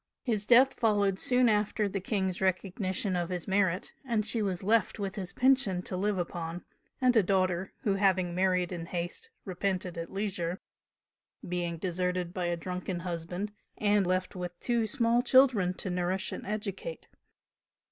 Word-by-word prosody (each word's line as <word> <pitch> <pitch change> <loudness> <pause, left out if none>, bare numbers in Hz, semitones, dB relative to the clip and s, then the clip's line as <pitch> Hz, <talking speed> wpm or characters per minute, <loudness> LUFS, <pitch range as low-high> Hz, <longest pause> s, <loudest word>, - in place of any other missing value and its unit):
His 215 -4 -1
death 255 +2 +7
followed 205 -4 +2
soon 250 -1 +3
after 210 0 +1
the 195 0 -3
King's 190 -2 -1
recognition 190 +1 0
of 175 -1 -1
his 180 -2 -4
merit, 190 -1 +1
and 230 -5 0
she 220 +1 +1
was 190 -3 -1
left 220 +3 +2
with 200 -2 -3
his 190 -3 -5
pension 250 -9 +2
to 185 - -4
live 200 +2 0
upon, 170 -1 -4 0.3
and 255 -2 +3
a 220 - +7
daughter 185 -1 +1
who 205 - +2
having 190 -3 +2
married 185 -1 +1
in 170 -2 -5
haste 175 - -4 0.2
repented 185 -2 -2
at 165 - -6
leisure, 190 -3 -2 0.9
being 175 -1 -2
deserted 180 0 -2
by 180 -2 -2
a 175 0 0
drunken 180 +1 -4
husband 175 +3 -4 0.3
and 205 -2 +2
left 185 +1 -1
with 180 -1 -6
two 235 -2 0
small 235 0 +2
children 250 -8 +5
to 185 - -4
nourish 180 +2 -1
and - - -6
educate. 210 - -4
190 Hz, 160 wpm, -30 LUFS, 180-210 Hz, 0.9 s, death